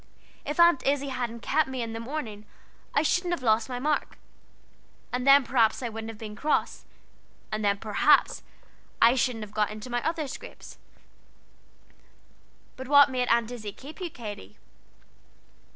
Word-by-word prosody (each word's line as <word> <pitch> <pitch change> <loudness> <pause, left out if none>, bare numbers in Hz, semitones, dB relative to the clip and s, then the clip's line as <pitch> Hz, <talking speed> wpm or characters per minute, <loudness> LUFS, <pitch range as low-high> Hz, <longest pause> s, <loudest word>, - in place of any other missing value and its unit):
If 295 +4 -4
Aunt 340 -4 +5
Izzie 280 0 0
hadn't 240 -3 -4
kept 305 +5 +1
me 260 -2 -3
in 225 -1 -5
the 225 - -5
morning, 230 -5 -6 0.5
I 285 - +3
shouldn't 350 +3 +1
have 265 - -13
lost 220 +1 +2
my 250 - -4
mark, 295 +4 -1 1.0
and 250 +1 -2
then 275 -1 +7
I 235 -3 +4
shouldn't 225 -2 -6
have 225 - -9
been 210 -1 -8
cross, 300 +8 -1 0.7
and 215 0 -3
then 200 -1 +2
perhaps 220 +8 +2 0.6
I 235 +1 +6
shouldn't 250 -3 -1
have 205 - -18
got 215 -1 +1
in 215 +4 -8
my 240 0 0
other 320 -2 -2
scrapes." - - -10 2.0
"But 260 0 -7
what 285 0 +6
made 250 -1 -1
Aunt 235 0 +2
Izzie 215 -4 -7
keep 295 - -12
you, 355 - -3
Katy?" 205 - -9
245 Hz, 155 wpm, -27 LUFS, 220-280 Hz, 2.0 s, then